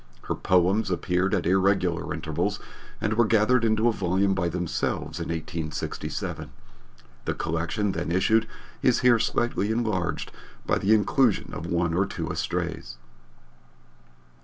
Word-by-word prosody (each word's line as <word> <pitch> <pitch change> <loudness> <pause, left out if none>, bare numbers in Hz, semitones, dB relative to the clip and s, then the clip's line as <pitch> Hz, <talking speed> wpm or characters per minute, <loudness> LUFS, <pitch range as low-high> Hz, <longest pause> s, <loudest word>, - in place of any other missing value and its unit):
Her - - -2
poems 95 +4 +2
appeared 90 +1 0
at - - -1
irregular 95 -1 +2
intervals - - -2 0.4
and 105 - 0
were 120 +1 +3
gathered 115 +3 +3
into 110 0 +2
a - - +4
volume 95 -1 +1
by 85 -3 0
themselves 85 -1 -2
in 85 - -4
1867. 80 -1 -4 0.8
The - - -1
collection 85 +6 -1
then 85 -2 -3
issued 110 +5 +3 0.3
is 125 - +3
here 120 -2 +5
slightly 115 -1 0
enlarged 110 -7 -1 0.3
by - - +1
the 105 +3 +4
inclusion 110 +2 +2
of 80 +3 -5
one 85 -1 0
or 95 +3 +2
two - - -4
estrays. - - -3
95 Hz, 135 wpm, -26 LUFS, 85-110 Hz, 0.8 s, here